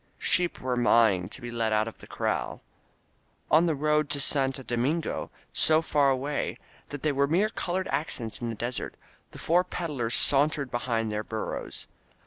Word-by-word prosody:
Sheep 180 -3 +1
were 125 -1 -1
maaing 110 -7 +3
to - - -7
be 120 0 -6
let 115 -2 -1
out 110 0 +2
of 115 - -8
the - - -12
corral. - - -2 0.9
On 165 +3 +5
the 160 - +1
road 150 +1 +1
to 150 -1 0
Santo 135 -1 +3
Domingo, 130 +8 -1 0.2
so 160 +1 +3
far 145 -3 +3
away 135 +2 -1 0.3
that 145 -2 -8
they 155 - +2
were 140 0 +2
mere 185 +8 +2
col 180 -4 -3
ored 190 0 -1
accents 130 -6 -3
in 120 - -2
the 115 - -4
desert, 120 +3 -3 0.3
the - - -12
four 175 +3 +2
peddlers 140 -11 -2
sauntered 140 -1 +3
behind 115 -2 -1
their 105 0 -2
burros. 110 0 -5
135 Hz, 175 wpm, -27 LUFS, 120-155 Hz, 0.9 s, On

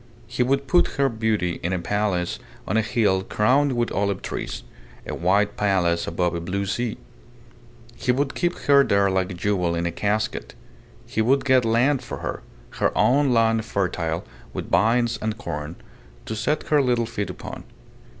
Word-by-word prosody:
He 120 - -3
would 135 +2 +1
put 175 +6 +2
her 140 -1 +3
beauty 110 -6 -1
in 90 - -2
a - - +1
palace 90 -1 -1 0.3
on - - -1
a 110 - +4
hill 105 -4 +1
crowned 130 +8 +2
with 120 -1 0
olive 100 -1 -1
trees - - -5 0.4
a - - -5
white 100 +4 +1
palace 90 -4 +1
above 90 +1 0
a 85 - -3
blue 95 +4 -2
sea. 120 +3 -2 1.0
He 130 - 0
would 135 +2 0
keep 175 0 -1
her 140 -1 +5
there 100 -4 +2
like 95 -1 0
a 90 - -6
jewel 90 -2 0
in 85 0 -1
a 85 - 0
casket. 100 - -2 0.5
He 110 - -1
would 135 +6 +2
get 130 -3 +4
land 125 +5 +2
for 125 - -6
her - - -5 0.4
her - - +2
own 140 +1 +4
land 115 -1 +3
fertile 90 -6 -2 0.3
with - - -6
vines 115 +1 +2
and 110 0 -2
corn 80 -6 -5 0.5
to - - -4
set 150 +7 -1
her 150 -2 +4
little 120 -3 +1
feet 110 -3 -4
upon. - - -8
110 Hz, 175 wpm, -23 LUFS, 95-125 Hz, 1.0 s, her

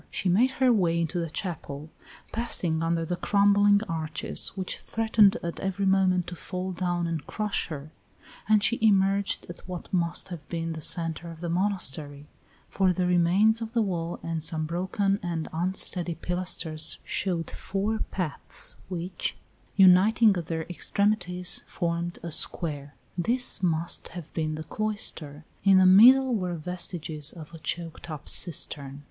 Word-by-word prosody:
She 190 - -2
made 225 +9 +4
her 255 -2 +4
way 170 -6 +2
into 170 +1 -1
the 165 -1 -3
chapel, 155 -3 -6 0.4
passing 175 -8 0
under 165 0 0
the 175 +2 -3
crumbling 205 +2 +4
arches 160 -3 -1
which 190 -2 -4
threatened 220 -1 +3
at 170 0 -4
every 195 +1 -2
moment 190 -2 +3
to 175 - -7
fall 185 +2 -5
down 175 -1 -1
and 165 -3 -4
crush 210 -1 -2
her, 150 -1 -7 0.6
and 215 -1 +5
she 235 - +2
emerged 200 -2 +2
at 175 - -9
what 180 +1 -7
must 170 -1 0
have 160 -4 -9
been 165 -1 -3
the 160 - -7
centre 165 +1 0
of 165 -1 -10
the 170 0 -4
monastery, 160 -6 -1 0.4
for 190 -1 +2
the 180 0 0
remains 180 +6 +3
of 225 0 -5
the 235 - +2
wall 170 -4 -3
and 165 -1 -3
some 155 0 -1
broken 190 +4 -1
and 170 -3 -3
unsteady 175 0 0
pilasters 165 -3 -1
showed 175 -4 -2
four 205 +3 -2
paths 180 -7 -2 0.2
which, 180 0 -4 0.4
uniting 200 +3 +6
at 170 -3 -4
their 160 -1 -2
extremities, 180 0 0
formed 170 0 -2
a 170 - -5
square. 145 -3 0 0.2
This 245 +6 +2
must 170 -2 0
have 165 -3 -9
been 155 -1 -2
the 155 - -6
cloister, 160 -7 -4 0.2
in 195 -1 +6
the 185 - +6
middle 250 +8 +7
were 180 -5 -1
vestiges 165 -3 -4
of 165 -1 -11
a 165 - -9
choked 165 +1 -4
up 155 -2 -7
cistern. 140 -4 -1
175 Hz, 155 wpm, -27 LUFS, 165-195 Hz, 0.6 s, middle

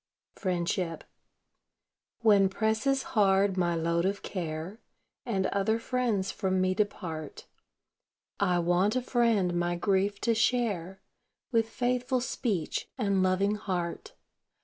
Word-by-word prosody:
FRIENDSHIP 175 -2 -2 1.2
When 205 -4 +5
presses 220 +7 0
hard 195 -3 +3
my 175 -2 +1
load 170 +1 0
of 195 +2 -1
care, 170 +3 -5 0.5
And 195 -5 0
other 200 +3 +1
friends 230 -5 -1
from 190 -2 -1
me 185 0 +2
depart, 170 -6 -4 0.9
I 180 -3 +2
want 175 +5 +2
a 255 - 0
friend 230 -8 +2
my 175 0 0
grief 195 +2 +1
to 230 - +2
share, 200 -6 0 0.5
With 225 -2 +2
faithful 250 +2 0
speech 215 -8 -2
and 200 -5 +1
loving 185 +2 +2
heart. 180 -4 -4
195 Hz, 115 wpm, -29 LUFS, 180-225 Hz, 1.2 s, When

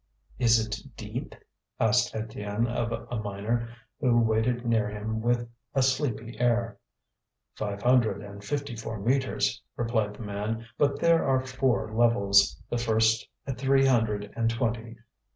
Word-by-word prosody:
"Is 115 -2 +5
it 110 -1 -3 0.2
deep?" - - -6 0.4
asked - - +2
Étienne 110 0 -2
of 120 -1 -2
a 115 -1 -4
miner, 105 +3 -2 0.3
who 120 -4 +3
waited 115 +2 +1
near 110 -3 +2
him 110 +2 -3
with 120 +1 +1 0.3
a 135 - +4
sleepy 125 -3 -1
air. 120 -2 +1 0.7
"Five 100 -1 -4
hundred 120 -5 +3
and 100 0 -10
fifty 140 +1 -3
four 110 -1 -5
metres," 130 +5 0
replied 110 -3 -1
the 115 - -8
man. 105 +3 -3
"But 145 -1 +1
there 170 -1 +4
are 130 -1 +2
four 130 -4 0
levels, 100 -8 +4
the 120 - -2
first 110 -1 +2 0.2
at 135 -2 -4
three 135 0 +4
hundred 110 -5 +1
and 115 -1 +1
twenty." 115 -1 -2
115 Hz, 145 wpm, -28 LUFS, 110-120 Hz, 0.7 s, Is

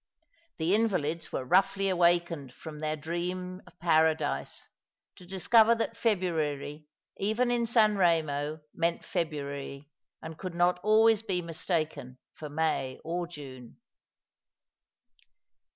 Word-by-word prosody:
The 165 +3 +1
invalids 170 -8 0
were 130 - -3
roughly 195 +6 +3
awakened 170 -6 +2
from 155 -2 -9
their 155 0 -1
dream 180 +4 -4
of - - -18
Paradise, 160 - +1 0.5
to 180 - -14
discover 220 +5 +4
that 230 0 -2
February 155 -9 -1 0.3
even 220 +5 +1
in 235 -1 +1
San 220 -2 +4
Eemo 155 -4 +1
meant 170 +1 -1
February, 140 -4 -4 0.3
and 160 -1 -9
could 185 -2 -6
not 175 +1 +2
always 220 +2 +4
be 190 -5 -2
mistaken 160 -6 -3 0.2
for 150 - -8
May 150 -4 -1
or 175 +1 -3
June. 130 -7 -11
170 Hz, 115 wpm, -29 LUFS, 150-190 Hz, 0.5 s, discover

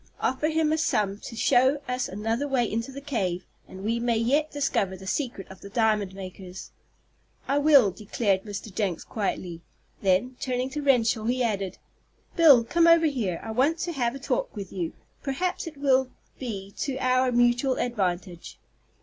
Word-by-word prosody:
Offer 265 +4 0
him 315 -1 +1
a 315 - 0
sum 205 -9 0
to 230 - -8
show 260 +4 +3
us 250 0 -2
another 225 +7 -2
way 260 -4 +1
into 230 +4 -3
the 275 +1 -8
cave, 200 -11 -2 0.2
and 190 +1 -10
we 230 +3 0
may 235 -1 +1
yet 280 +7 +2
discover 210 -10 -1
the 190 - -11
secret 235 -2 -3
of 190 - -13
the 200 - -9
diamond 210 -3 +1
makers." 185 -1 -9 0.8
"I 280 +1 +2
will," 280 -8 +6
declared 200 -1 -1
Mr. 205 0 -7
Jenks, 185 -5 -1
quietly. 180 -5 -3 0.4
Then, 200 +7 +1
turning 255 0 -2
to 295 - -3
Renshaw, 235 -5 +2
he 250 +2 +1
added: 200 -5 -2 0.6
"Bill, 290 -8 +7
come 335 +8 +3
over 335 -1 +6
here. 225 - -1
I 225 - -5
want 275 +8 +2
to 345 +1 -3
have 245 -5 -1
a - - -7
talk - - -2
with 200 -3 -7
you. 175 -4 -3 0.3
Perhaps 335 +6 -2
it 315 -3 -8
will 265 -2 +2 0.3
be 200 -6 -5
to 275 -3 -2
our 255 0 +2
mutual 245 +2 +3
advantage." 185 -6 -2
240 Hz, 175 wpm, -26 LUFS, 200-275 Hz, 0.8 s, Bill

